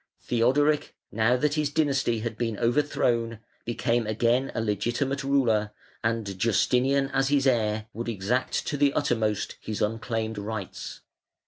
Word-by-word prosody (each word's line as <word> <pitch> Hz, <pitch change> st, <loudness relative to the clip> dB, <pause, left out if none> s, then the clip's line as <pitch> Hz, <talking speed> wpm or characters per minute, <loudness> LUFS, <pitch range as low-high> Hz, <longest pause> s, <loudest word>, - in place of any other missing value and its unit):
Theodoric, 140 Hz, +6 st, +2 dB, 0.2 s
now 115 Hz, +4 st, +2 dB
that 145 Hz, +3 st, +1 dB
his 150 Hz, -1 st, 0 dB
dynasty 140 Hz, -6 st, +1 dB
had 115 Hz, -1 st, -3 dB
been 115 Hz, -2 st, -2 dB
overthrown, 120 Hz, -2 st, +1 dB, 0.3 s
became 120 Hz, -1 st, 0 dB
again 120 Hz, +5 st, +1 dB
a -, -, 0 dB
legitimate 120 Hz, +6 st, -1 dB
ruler, 115 Hz, -7 st, +2 dB, 0.3 s
and 110 Hz, -4 st, -2 dB
Justinian 130 Hz, +6 st, +2 dB
as 135 Hz, -1 st, +1 dB
his 140 Hz, -1 st, +2 dB
heir 110 Hz, -4 st, +1 dB
would 115 Hz, +2 st, -4 dB
exact 115 Hz, +5 st, -1 dB
to 145 Hz, -, -2 dB
the 140 Hz, 0 st, +3 dB
uttermost 110 Hz, -7 st, 0 dB
his 110 Hz, -1 st, -4 dB
unclaimed 110 Hz, 0 st, -2 dB
rights. 100 Hz, -2 st, -6 dB
115 Hz, 135 wpm, -26 LUFS, 110-135 Hz, 0.3 s, the